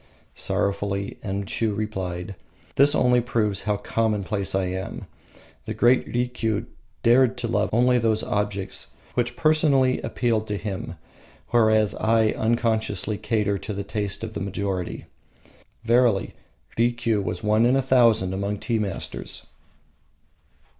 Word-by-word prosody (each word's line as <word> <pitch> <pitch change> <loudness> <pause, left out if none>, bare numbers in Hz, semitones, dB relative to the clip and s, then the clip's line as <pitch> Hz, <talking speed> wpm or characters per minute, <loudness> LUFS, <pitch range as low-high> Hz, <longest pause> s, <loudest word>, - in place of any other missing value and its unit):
Sorrowfully 100 0 -1
Enshiu 100 +2 -2
replied: 95 -3 -4 0.4
"This 145 +2 +6
only 125 -1 +4
proves 105 -4 0
how 105 -1 +1
commonplace 105 -2 -1
I 95 - +1
am. 95 +1 -5 0.6
The - - -4
great 120 +2 +3
Rikiu 120 -3 -1 0.4
dared 125 +1 +4
to 125 -1 -3
love 110 -2 0
only 125 +2 +3
those 110 -1 +1
objects 105 -2 -2 0.2
which 120 -1 -1
personally 155 -5 +3
appealed 115 -3 -1
to 105 - -2
him, 95 -4 -5 0.5
whereas 110 -3 +3
I 110 0 +2
unconsciously 110 -2 0
cater 105 -2 0
to 105 - -5
the 100 0 -4
taste 100 0 -3
of 110 -1 -5
the - - -4
majority. 95 -2 -3 0.8
Verily, 115 -3 +2 0.5
Rikiu 120 -2 +1
was - - -4
one 110 +2 +3
in 125 - +3
a 135 - +3
thousand 115 -7 +3
among 100 +2 -2
tea 115 +2 -1
masters." 100 -3 -4
110 Hz, 125 wpm, -24 LUFS, 100-120 Hz, 0.8 s, This